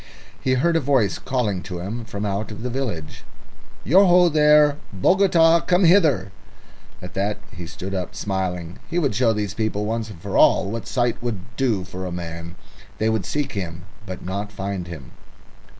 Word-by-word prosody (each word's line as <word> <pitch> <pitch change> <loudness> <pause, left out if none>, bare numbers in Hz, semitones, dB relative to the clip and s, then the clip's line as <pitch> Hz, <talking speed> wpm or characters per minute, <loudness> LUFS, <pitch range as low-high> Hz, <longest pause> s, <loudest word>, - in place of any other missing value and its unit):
He 130 0 +2
heard 170 +6 +2
a - - +4
voice 130 -8 +1
calling 110 -8 -1
to 90 -1 -6
him 110 +6 -5
from 105 -1 -5
out 100 +2 -2
of 105 +2 -8
the 125 - -3
village. 110 - -4 0.6
"Ya 185 - +6
ho 180 -2 +6
there, 150 -1 +5
Bogota! 170 - +4
Come 180 +2 +2
hither!" 165 - +4 0.7
At 90 - -8
that 100 +2 -1 0.2
he 85 -1 -7
stood 95 +3 -7
up 95 -2 -4
smiling. 90 -3 -3
He 170 - -2
would 145 -9 +1
show 115 +2 +3
these 105 -3 -2
people 105 -1 -1
once 110 0 -2
and 100 -6 -10
for - - -5
all 95 - +4
what 115 -1 -5
sight 120 -2 0
would 115 -2 -5
do 115 -8 0
for 95 0 -6
a - - -5
man. 85 -1 -6 0.4
They 110 +1 +1
would 110 -5 -1
seek 145 -2 -2
him, 85 -4 -5 0.2
but 95 -1 -7
not 100 +3 -4
find 95 -3 -4
him. 80 -7 -9
105 Hz, 180 wpm, -22 LUFS, 95-135 Hz, 0.7 s, Ya